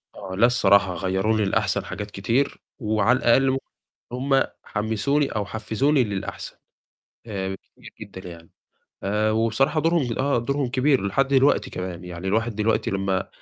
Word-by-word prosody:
آه، 95 Hz, 0 st, -7 dB
لأ 115 Hz, -, +5 dB
الصراحة، 100 Hz, -6 st, +4 dB
غيّروني 95 Hz, +5 st, 0 dB
للأحسن 95 Hz, -, 0 dB
حاجات 105 Hz, 0 st, -6 dB
كتير، 115 Hz, +9 st, -1 dB, 0.2 s
وعلى 110 Hz, +3 st, +2 dB
الأقل 130 Hz, +3 st, +4 dB
م 135 Hz, -, 0 dB, 0.5 s
هُم 135 Hz, +2 st, +2 dB, 0.2 s
حمسوني 110 Hz, +7 st, 0 dB
أو 105 Hz, -2 st, -2 dB
حفزوني 120 Hz, +7 st, +1 dB
للأحسن، 100 Hz, -3 st, -5 dB, 0.7 s
آآ 95 Hz, -3 st, -4 dB, 0.2 s
كتير -, -, -13 dB
جدًا 95 Hz, -3 st, -9 dB
يعني، 85 Hz, -1 st, -13 dB, 0.5 s
آآ 105 Hz, +2 st, +1 dB
وبصراحة 115 Hz, +8 st, +1 dB
دورهم 160 Hz, -8 st, +1 dB
آه، 140 Hz, -1 st, +2 dB
دورهم 140 Hz, +2 st, -1 dB
كبير 130 Hz, -2 st, +2 dB
لحد 135 Hz, +8 st, +1 dB
دلوقتي 135 Hz, +1 st, +3 dB
كمان، 90 Hz, -1 st, -6 dB
يعني 90 Hz, +1 st, -7 dB
الواحد 110 Hz, +3 st, 0 dB
دلوقتي 110 Hz, +1 st, 0 dB
لمّا 95 Hz, -1 st, -1 dB
110 Hz, 145 wpm, -24 LUFS, 95-130 Hz, 0.7 s, لأ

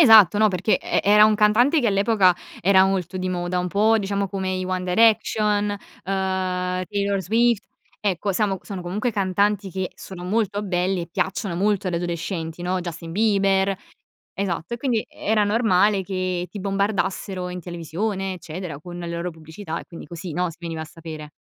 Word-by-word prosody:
Esatto, 220 Hz, -, +8 dB
no 215 Hz, 0 st, +5 dB
perché 185 Hz, +3 st, +1 dB
e -, -, 0 dB
era 210 Hz, +1 st, +7 dB
un 215 Hz, 0 st, +5 dB
cantante 240 Hz, +9 st, +4 dB
che 235 Hz, -, +2 dB
all'epoca 200 Hz, -2 st, +4 dB, 0.3 s
era 190 Hz, +1 st, +5 dB
molto 190 Hz, -2 st, -1 dB
di 185 Hz, 0 st, -2 dB
moda, 180 Hz, 0 st, -1 dB
un 180 Hz, -, -1 dB
po' 220 Hz, +4 st, +3 dB
diciamo 200 Hz, -1 st, -1 dB
come 190 Hz, -1 st, -2 dB
i 185 Hz, 0 st, -2 dB
One 185 Hz, 0 st, -2 dB
Direction, 210 Hz, +1 st, +3 dB
uhm, 205 Hz, -, -2 dB, 1.1 s
Taylor 200 Hz, -1 st, 0 dB
Swift, 230 Hz, +4 st, +2 dB, 0.4 s
ecco 200 Hz, 0 st, 0 dB
samo 195 Hz, -1 st, 0 dB
sono 195 Hz, -3 st, -6 dB
comunque 200 Hz, +7 st, -2 dB
cantanti 200 Hz, 0 st, +1 dB
che 190 Hz, 0 st, -3 dB
sono 185 Hz, -2 st, -9 dB
molto 205 Hz, +1 st, 0 dB
belli 185 Hz, -1 st, 0 dB
e 170 Hz, -, -8 dB
piacciono 185 Hz, 0 st, -2 dB
molto 200 Hz, 0 st, +1 dB
agli 180 Hz, -, -2 dB
adolescenti, 170 Hz, -1 st, -4 dB
no? 180 Hz, +1 st, -1 dB
Justin 170 Hz, -1 st, -6 dB
Bieber 195 Hz, -2 st, +2 dB, 0.6 s
esatto 180 Hz, +2 st, -2 dB
e -, -, -4 dB
quindi 240 Hz, -3 st, 0 dB
era 215 Hz, 0 st, 0 dB
normale 205 Hz, -2 st, +3 dB
che 185 Hz, -2 st, -2 dB
ti 200 Hz, -, -7 dB
bombardassero 195 Hz, -1 st, -1 dB
in 180 Hz, 0 st, -5 dB
televisione 185 Hz, +3 st, -3 dB
eccetera 170 Hz, -3 st, -7 dB
con 175 Hz, +1 st, -9 dB
le 170 Hz, -1 st, -5 dB
loro 170 Hz, +1 st, -3 dB
pubblicità 160 Hz, +2 st, -7 dB
e -, -, -12 dB
quindi 170 Hz, -, -10 dB
così, 170 Hz, 0 st, -7 dB
no, 180 Hz, +2 st, 0 dB
si 165 Hz, -, -15 dB
veniva 165 Hz, -2 st, -4 dB
a -, -, -6 dB
sapere. 155 Hz, -1 st, -9 dB
190 Hz, 175 wpm, -23 LUFS, 175-205 Hz, 1.1 s, Esatto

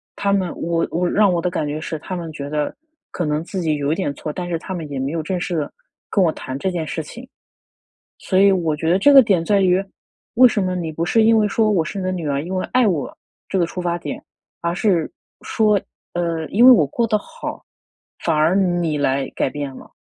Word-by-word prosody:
他 200 Hz, 0 st, 0 dB
们 185 Hz, -3 st, 0 dB
我 165 Hz, 0 st, 0 dB
我 175 Hz, +1 st, 0 dB
让 205 Hz, -2 st, +4 dB
我 170 Hz, -, 0 dB
的 180 Hz, -, 0 dB
感 155 Hz, -4 st, -2 dB
觉 150 Hz, +1 st, -3 dB
是 160 Hz, 0 st, -4 dB
他 185 Hz, -, -6 dB
们 170 Hz, -2 st, -5 dB
觉 140 Hz, -1 st, -6 dB
得， 150 Hz, -1 st, -2 dB, 0.4 s
可 175 Hz, -, -3 dB
能 150 Hz, 0 st, 0 dB
自 185 Hz, +1 st, -4 dB
己 155 Hz, -2 st, 0 dB
有 145 Hz, 0 st, -1 dB
一 -, -, -1 dB
点 170 Hz, -7 st, -2 dB
错， 150 Hz, -, -5 dB
但 180 Hz, -1 st, -4 dB
是 165 Hz, -1 st, -1 dB
他 190 Hz, -, -6 dB
们 160 Hz, -4 st, -5 dB
也 135 Hz, -, -3 dB
没 135 Hz, +2 st, -2 dB
有 165 Hz, -2 st, -2 dB
正 180 Hz, +2 st, -2 dB
式 175 Hz, 0 st, -3 dB
地 150 Hz, -, -2 dB, 0.4 s
跟 195 Hz, -, +2 dB
我 165 Hz, -, +3 dB
谈 130 Hz, +1 st, -6 dB
这 190 Hz, -, -1 dB
件 170 Hz, -3 st, -3 dB
事 160 Hz, -, -3 dB
情。 235 Hz, -, -11 dB, 0.9 s
所 185 Hz, -, 0 dB
以 200 Hz, 0 st, +6 dB
我 165 Hz, -5 st, 0 dB
觉 160 Hz, +2 st, -1 dB
得 185 Hz, -, +3 dB
这 285 Hz, +8 st, +5 dB
个 270 Hz, -1 st, +10 dB
点 195 Hz, -7 st, +2 dB
在 200 Hz, 0 st, +3 dB
于， 185 Hz, +1 st, +3 dB, 0.5 s
为 255 Hz, +2 st, +7 dB
什 215 Hz, -4 st, +1 dB
么 185 Hz, 0 st, -1 dB
你 165 Hz, -3 st, -3 dB
不 165 Hz, +2 st, -2 dB
是 220 Hz, +5 st, +3 dB
因 225 Hz, 0 st, +5 dB
为 210 Hz, -1 st, +2 dB
说， 215 Hz, +1 st, +2 dB
我 180 Hz, -6 st, +2 dB
是 195 Hz, -, -5 dB
你 185 Hz, -, -3 dB
的 185 Hz, -, -1 dB
女 170 Hz, -4 st, -3 dB
儿， 140 Hz, 0 st, -1 dB
因 185 Hz, -, -4 dB
为 185 Hz, -, -1 dB
爱 250 Hz, -2 st, +4 dB
我， 160 Hz, -9 st, -1 dB, 0.3 s
这 190 Hz, -, -1 dB
个 170 Hz, -, +2 dB
出 180 Hz, -, -6 dB
发 175 Hz, 0 st, -1 dB
点， -, -, -6 dB, 0.4 s
而 170 Hz, 0 st, -1 dB
是， 180 Hz, -5 st, +1 dB, 0.3 s
说， 210 Hz, -2 st, +2 dB, 0.3 s
呃， 170 Hz, -2 st, -2 dB
因 235 Hz, +5 st, +5 dB
为 260 Hz, -, +11 dB
我 180 Hz, -, +6 dB
过 235 Hz, -, -1 dB
得 215 Hz, -2 st, +2 dB
好， -, -, -8 dB, 0.6 s
反 155 Hz, -, +1 dB
而 155 Hz, +4 st, +3 dB
你 175 Hz, -5 st, +1 dB
来 135 Hz, -1 st, 0 dB
改 -, -, 0 dB
变 140 Hz, -2 st, -5 dB
了， -, -, -13 dB
175 Hz, 270 characters per minute, -20 LUFS, 155-195 Hz, 0.9 s, 为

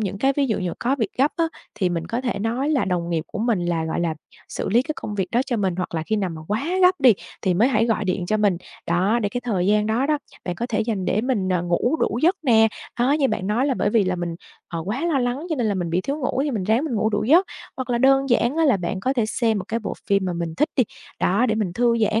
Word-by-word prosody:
những 200 Hz, -2 st, -3 dB
cái 270 Hz, +3 st, +2 dB
ví 280 Hz, -1 st, +2 dB
dụ 220 Hz, -, 0 dB
dụ 180 Hz, -2 st, -2 dB
có 265 Hz, +4 st, 0 dB
việc 220 Hz, -4 st, 0 dB
gấp 280 Hz, +3 st, +3 dB
á, 335 Hz, -, +2 dB, 0.3 s
thì 195 Hz, -4 st, 0 dB
mình 170 Hz, -1 st, -3 dB
có 235 Hz, -, -2 dB
thể 245 Hz, -5 st, -2 dB
nói 235 Hz, +7 st, -1 dB
là 275 Hz, -9 st, +2 dB
đồng 175 Hz, -2 st, -1 dB
nghiệp 160 Hz, -2 st, -1 dB
của -, -, -7 dB
mình 215 Hz, -6 st, 0 dB
là, 165 Hz, -2 st, 0 dB
gọi 160 Hz, -, -2 dB
là, 170 Hz, -2 st, 0 dB, 0.3 s
xử -, -, -4 dB
lý 235 Hz, +5 st, +4 dB
cái 310 Hz, -, -3 dB
công 210 Hz, -, -5 dB
việc 190 Hz, -3 st, -2 dB
đó 240 Hz, -, +2 dB
cho 240 Hz, -, -1 dB
mình, 190 Hz, -4 st, 0 dB
hoặc 180 Hz, -2 st, -4 dB
là 160 Hz, -, -1 dB
khi 215 Hz, +6 st, -1 dB
nào 190 Hz, -4 st, -1 dB
mà 160 Hz, -1 st, -7 dB
quá 215 Hz, +6 st, -1 dB, 0.2 s
gấp 365 Hz, -2 st, +5 dB
đi, 255 Hz, -4 st, +7 dB, 0.3 s
thì 185 Hz, -2 st, +2 dB
mới 225 Hz, +8 st, +4 dB
hãy 230 Hz, -2 st, +2 dB
gọi 215 Hz, -2 st, 0 dB
điện 180 Hz, -1 st, -1 dB
cho 215 Hz, +3 st, +1 dB
mình, 205 Hz, -4 st, +2 dB, 0.3 s
đó. 185 Hz, +7 st, +2 dB
Để 205 Hz, -, +1 dB
cái 245 Hz, +3 st, -4 dB
thời 195 Hz, -7 st, -1 dB
gian 210 Hz, +1 st, +3 dB
đó 235 Hz, +5 st, +1 dB
đó, 300 Hz, -1 st, +1 dB, 0.3 s
bạn 180 Hz, -, -2 dB
có 235 Hz, +6 st, -3 dB
thể 215 Hz, -, 0 dB
dành 215 Hz, -5 st, -1 dB
để 200 Hz, -, +1 dB
mình, 225 Hz, -8 st, 0 dB
ờ, 180 Hz, -2 st, +1 dB
ngủ 175 Hz, -, +1 dB
đủ 230 Hz, -, 0 dB
giấc 360 Hz, +5 st, +4 dB
nè, 225 Hz, -5 st, +5 dB, 0.3 s
đó. 255 Hz, +4 st, +3 dB
Như 285 Hz, -3 st, +2 dB
bạn 185 Hz, -, -2 dB
nói 235 Hz, +7 st, +1 dB
là 270 Hz, -, +1 dB
bởi -, -, 0 dB
vì 215 Hz, -3 st, +3 dB
là 185 Hz, 0 st, -1 dB
mình, 170 Hz, -1 st, -3 dB, 0.3 s
ờ, 165 Hz, -, -4 dB
quá 250 Hz, +11 st, -2 dB
lo 300 Hz, -5 st, +1 dB
lắng 250 Hz, +6 st, -2 dB
cho 315 Hz, -, 0 dB
nên 240 Hz, -3 st, 0 dB
là 205 Hz, -, 0 dB
mình 175 Hz, -3 st, -2 dB
bị 175 Hz, -, +1 dB
thiếu 275 Hz, +9 st, -3 dB
ngủ, 265 Hz, 0 st, -1 dB
thì 295 Hz, -, -1 dB
mình 215 Hz, -7 st, -2 dB
ráng 225 Hz, +9 st, +2 dB
mình 280 Hz, -, -2 dB
ngủ 220 Hz, 0 st, +1 dB
đủ 210 Hz, 0 st, 0 dB
giấc. 335 Hz, -, +5 dB, 0.3 s
Hoặc 260 Hz, -1 st, -4 dB
là 240 Hz, -, +1 dB
đơn 270 Hz, +1 st, +4 dB
giản 240 Hz, +4 st, +2 dB
á 330 Hz, -, +3 dB
là 270 Hz, -8 st, +4 dB
bạn 185 Hz, +1 st, -3 dB
có 260 Hz, +7 st, 0 dB
thể 235 Hz, -5 st, 0 dB
xem 225 Hz, -1 st, 0 dB
một 185 Hz, -, -5 dB
cái 230 Hz, +1 st, -1 dB
bộ -, -, -4 dB
phim 200 Hz, -1 st, +2 dB
mà 180 Hz, -, -1 dB
mình 170 Hz, -1 st, -4 dB
thích 300 Hz, -, +1 dB
đi, 255 Hz, -, +4 dB, 0.4 s
đó, 215 Hz, +7 st, +2 dB
để 220 Hz, -, +1 dB
mình 205 Hz, -5 st, -1 dB
thư 235 Hz, +2 st, +2 dB
giãn. 220 Hz, 0 st, +2 dB
220 Hz, 305 wpm, -23 LUFS, 185-255 Hz, 0.4 s, đi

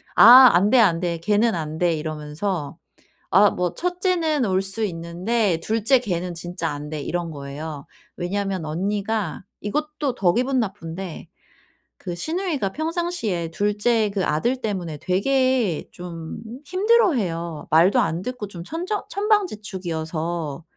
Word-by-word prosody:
"아 250 Hz, +3 st, +10 dB
안 185 Hz, +4 st, +4 dB
돼, 260 Hz, -, +6 dB
안 175 Hz, -7 st, +4 dB
돼. 170 Hz, -2 st, -1 dB
걔는 210 Hz, +3 st, +2 dB
안 155 Hz, -1 st, -4 dB
돼." 175 Hz, -2 st, +3 dB
이러면서 155 Hz, +2 st, -4 dB, 0.5 s
아 200 Hz, +3 st, +6 dB
뭐 180 Hz, -1 st, -2 dB
"첫째는 355 Hz, -5 st, 0 dB
올 190 Hz, -1 st, +1 dB
수 195 Hz, +3 st, -3 dB
있는데 180 Hz, +2 st, -1 dB
2 220 Hz, -1 st, -1 dB
째 265 Hz, +3 st, +5 dB
걔는 180 Hz, -6 st, -3 dB
진짜 170 Hz, -1 st, -4 dB
안 145 Hz, 0 st, -6 dB
돼." 155 Hz, -1 st, -4 dB
이런 170 Hz, +2 st, -3 dB
거예요. 145 Hz, 0 st, -7 dB, 0.3 s
왜냐하면 190 Hz, 0 st, -2 dB
언니가 200 Hz, +3 st, -2 dB, 0.2 s
이것도 300 Hz, +4 st, -2 dB
더 180 Hz, -3 st, +3 dB
기분 255 Hz, +2 st, +1 dB
나쁜데 185 Hz, -5 st, -5 dB, 0.7 s
그 175 Hz, -3 st, -5 dB
시누이가 315 Hz, -, -2 dB
평상시에 315 Hz, -, -2 dB
2 205 Hz, +4 st, 0 dB
째 220 Hz, 0 st, +2 dB
그 195 Hz, -2 st, 0 dB
아들 235 Hz, +13 st, 0 dB
때문에 180 Hz, -8 st, -3 dB
되게 250 Hz, -, +1 dB
좀 170 Hz, -2 st, -8 dB, 0.3 s
힘들어해요. 260 Hz, -, +1 dB
말도 170 Hz, +5 st, +5 dB
안 165 Hz, +2 st, 0 dB
듣고 250 Hz, -3 st, -5 dB
좀 175 Hz, -4 st, -9 dB
천정 350 Hz, -, -3 dB
천방지축이어서. 175 Hz, -, -2 dB
195 Hz, 260 characters per minute, -23 LUFS, 170-245 Hz, 0.7 s, 아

